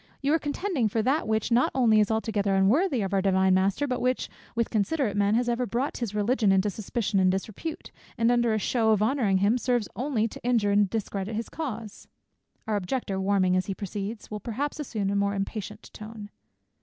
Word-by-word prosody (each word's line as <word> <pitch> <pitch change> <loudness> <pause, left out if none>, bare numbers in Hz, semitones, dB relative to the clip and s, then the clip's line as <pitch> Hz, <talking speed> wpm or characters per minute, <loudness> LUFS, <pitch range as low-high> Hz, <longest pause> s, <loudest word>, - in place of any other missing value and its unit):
You 285 +2 +2
are 325 - +3
contending 290 - -1
for 220 +1 0
that 270 +4 +1
which 220 +1 0
not 240 +2 +4
only 230 -5 +4
is 210 - +3
altogether 215 -3 0
unworthy 240 - +3
of 195 0 -3
our 195 - +3
Divine 190 -1 +3
Master, 190 +9 +2
but 250 -3 -2
which, 255 +1 0 0.3
with 230 -1 0
considerate 225 +1 0
men, 205 +1 +2
has 240 +1 +1
ever 240 +1 0
brought 245 +7 -2
his 225 -4 -4
religion 210 0 +2
into 195 +2 +2
suspicion 210 0 -1
and 185 -1 +4
disrepute, 215 - -5 0.3
and 230 +1 +3
under 240 -1 +2
a 220 - +1
shew 225 +2 0
of 215 -1 +3
honouring 220 -5 +2
him, 205 +6 +2
serves 245 -4 0
only 245 -4 0
to - - -11
injure 230 -4 +2
and 205 -1 +3
discredit 210 -1 -3
his 225 +1 -4
cause." 230 -9 -6 0.6
Our 215 -1 0
Objector, 195 -1 -2
warming 190 -2 +2
as 185 - 0
he 195 - -3
proceeds, 205 +3 -6
will 210 - -4
perhaps 270 +8 -4
assume 215 -9 -2
a - - -1
more 200 0 +1
impatient 210 +1 -5
tone. 215 -1 -9
215 Hz, 205 wpm, -27 LUFS, 200-245 Hz, 0.6 s, not